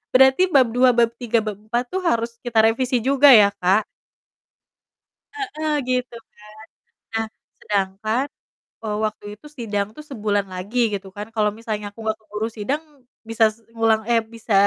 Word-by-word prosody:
berarti 265 +8 +6
bab 265 -9 +4
2, 250 +1 +4
bab 235 -1 +3
3, 235 -2 +1
bab 210 -2 -5
4 225 +3 -2
tuh 375 - -1
harus 235 -9 -1
kita 235 -3 +2
revisi 240 +2 +1
juga 275 +2 +5
ya, 205 -2 +6
Kak. 190 +4 +3 1.5
Heeh, 395 -8 -3 0.2
gitu 250 -1 -1 0.2
kan. - - -23 0.7
Nah, 225 0 0 0.3
sedangkan, 210 +5 -1 0.6
eee, 210 -1 -2
waktu 215 -1 -5
itu 210 - -23
sidang 205 -4 -2
tuh 305 - -8
sebulan 205 -4 -1
lagi 200 +7 -4
gitu 195 -1 -4
kan, 205 +1 -6
kalau 210 -1 +2
misalnya 215 -2 -4
aku 205 - -18
nggak 220 0 -1
keburu 215 0 -4
sidang, 270 +9 -2 0.5
bisa 225 0 +3
se - - -26 0.2
ngulang, 225 -1 +2
eh, 230 -1 +4
bisa 225 -1 -4
225 Hz, 160 wpm, -22 LUFS, 210-250 Hz, 1.5 s, berarti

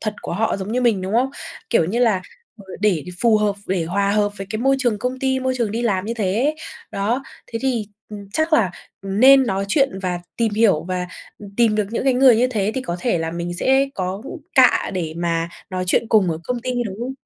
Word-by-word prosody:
thật 215 -1 -3
của - - -5
họ 220 +4 0
giống 200 +3 -5
như 250 - +1
mình, 225 -6 +2
đúng 190 +2 -4
không? 255 +3 +2 0.4
Kiểu 200 -9 +4
như 215 +8 -2
là, 215 -7 +2 0.3
vừa 195 -3 -11
để 190 -8 +1 0.2
phù 225 -2 +5
hợp, 210 -1 +1
để 180 -3 0
hòa 200 +4 0
hợp 205 -1 +1
với 195 - -5
cái 215 - -2
môi 270 +1 +3
trường 240 -6 0
công 255 +3 -3
ty, 265 0 0
môi 260 0 0
trường 230 -4 -1
đi 230 +3 -2
làm 195 -5 0
như 230 - -3
thế. 230 +8 0 0.4
Đó, 225 +7 -1 0.2
thế 230 - -5
thì, 240 -6 0 0.2
ừm, 205 -2 -9
chắc 315 +1 0
là, 215 - +4 0.3
ừm, 195 +2 -3
nên 265 0 +7
nói 195 -2 -1
chuyện 270 -5 +1
và 180 -1 -2 0.2
tìm 230 -2 0
hiểu 210 -8 +3
và, 180 0 -3 0.3
ừm, 205 -1 -10
tìm 230 -3 +3
được 210 - +2
những 235 - -2
cái 265 - +4
người 255 -2 +6
như 250 +2 +3
thế 210 -3 0
thì 260 - -2
có 170 -7 -3
thể 230 -7 +1
là 160 0 -2
mình 170 +1 -4
sẽ 265 +8 +2
có 190 +3 -3 0.3
cạ - - +5
để 165 -3 -3
mà 170 -1 -1 0.2
nói 185 0 -2
chuyện 225 - +2
cùng 200 -6 +4
ở 160 - -3
công 245 -1 -2
ty, 255 +1 -3 0.2
đúng 190 -1 -6
không? 255 +2 -3
210 Hz, 245 wpm, -21 LUFS, 190-245 Hz, 0.4 s, nên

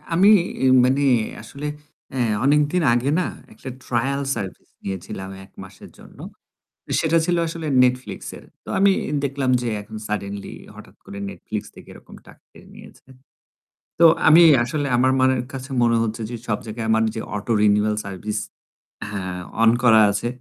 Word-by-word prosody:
আমি 185 +5 +4 0.6
মানে 135 +3 +2 0.4
আসলে 145 +1 -8 0.5
অ্যা 130 - -5 0.3
অনেকদিন 150 +5 +2
আগে 125 +3 0
না - - 0 0.3
একটা 130 - -9 0.2
ট্রায়াল 135 +3 -1
সার্ভিস 100 -5 -7 0.2
নিয়েছিলাম 95 0 -6
১ 95 - -20
মাসের - - -13
জন্য। - - -16 0.8
সেটা 165 +1 +2
ছিলো 175 0 +1
আসলে 165 -1 -5 0.2
Netflix 125 -6 -1 0.2
এর, - - -16 0.2
তো - - -12
আমি 200 0 +5 0.3
দেখলাম 135 -1 -1
যে 120 - -3
এখন 110 +1 -10
সাডেনলি 100 -1 -5 0.2
হঠাৎ - - -14
করে 100 - -9
Netflix - - -6
থেকে - - -14
এরকম - - -15
টাকা - - -17
কেটে - - -17
নিয়েছে। - - -16 0.9
তো 170 - +7 0.2
আমি 160 +2 +8 0.2
আসলে 145 +4 -2
আমার 130 +2 +3
মনের 130 -1 +2
কাছে 130 +1 -7
মনে 115 -1 +3
হচ্ছে 110 0 -4
যে 120 - -5
সব 105 - 0
জায়গায় 110 +1 -5
আমার 110 0 +3
যে 110 - -3
অটো 105 +3 -4
রিনিউয়াল 105 +1 +2
সার্ভিস 100 +2 -4 0.7
হ্যাঁ, 95 -3 -5 0.2
অন 115 0 +6
করা 110 -3 +6
আছে। 100 +4 -2
120 Hz, 155 wpm, -21 LUFS, 105-140 Hz, 0.9 s, আমি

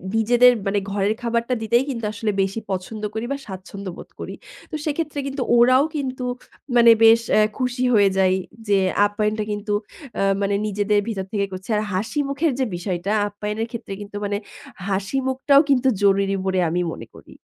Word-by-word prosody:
নিজেদের 240 +3 +5 0.2
মানে 200 +1 +1
ঘরের 200 +1 +1
খাবারটা 235 +1 0
দিতেই 235 +3 +2
কিন্তু 235 -5 -3
আসলে 215 0 -1
বেশি 195 +3 -1
পছন্দ 195 +3 -4
করি 220 +2 -3
বা, 280 - -1
স্বাচ্ছন্দ্য 190 0 -7
বোধ - - -11
করি। - - -6 0.4
তো - - -3
সেক্ষেত্রে 305 -1 -2
কিন্তু 275 -1 -2
ওরাও 255 +3 +6
কিন্তু 260 -3 -3 0.5
মানে 235 -1 +8
বেশ 225 +1 +7 0.2
আ - - +6 0.2
খুশি 250 -1 -1
হয়ে 205 -3 +5
যায় 185 -1 +4 0.3
যে 200 -1 +4 0.3
আপ্যায়নটা 210 +1 -1
কিন্তু 205 0 -3 0.5
আ - - +1 0.2
মানে 200 0 +1
নিজেদের 205 0 +1
ভিতর 195 -4 -3
থেকে 200 -2 +1
করছে। 185 +2 -8
আর - - +1
হাসিমুখের 275 - 0
যে 260 - +2
বিষয়টা, 180 +2 -3 0.2
আপ্যায়নের 210 +2 -4
ক্ষেত্রে 230 -4 -6
কিন্তু 205 0 -10
মানে 205 0 -1 0.5
হাসিমুখটাও 265 +8 +2
কিন্তু 265 -1 +3
জরুরি 195 0 +3
বলে 190 -1 +1
আমি 175 +2 0
মনে - - -9
করি। - - -14
215 Hz, 170 wpm, -22 LUFS, 200-250 Hz, 0.5 s, মানে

